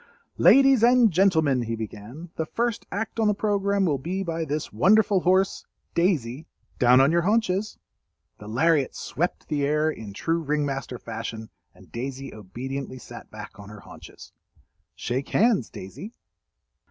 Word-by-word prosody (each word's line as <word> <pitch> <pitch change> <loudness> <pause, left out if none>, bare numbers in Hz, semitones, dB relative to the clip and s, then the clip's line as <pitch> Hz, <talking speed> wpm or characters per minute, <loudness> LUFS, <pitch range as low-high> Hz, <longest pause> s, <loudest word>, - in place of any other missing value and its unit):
"Ladies 270 -3 +6
and 240 -2 +5
Gentlemen," 160 -8 +3
he 115 -1 -3
began, 115 +9 -8
"the 160 - -3
first 235 +2 -2
act 225 +3 -4
on 220 - +3
the 210 - +2
programme 200 -1 +1
will 145 -6 0
be 185 +8 -3
by 165 -2 -3
this 150 -4 -4
wonderful 195 - +4
horse—Daisy, 170 -6 -1 0.3
down 125 +1 +6
on 135 +3 +5
your 170 +1 +3
haunches!" 210 +1 0 0.6
The 105 - -11
lariat 145 +5 +1
swept 170 +7 -3
the 145 -2 -1
air 150 +2 +1
in 110 -8 -9
true 165 +10 -1
ring 150 -1 0
master 135 -2 -4
fashion, 115 -1 -7 0.2
and - - -19
Daisy 135 +3 -6
obediently 130 +6 -6
sat - - -11
back - - -10
on 100 0 -11
her 105 -1 -11
haunches. - - -13 0.6
"Shake 130 +3 -3
hands, 220 - +2
Daisy." 190 - -9
155 Hz, 150 wpm, -25 LUFS, 125-195 Hz, 0.6 s, Ladies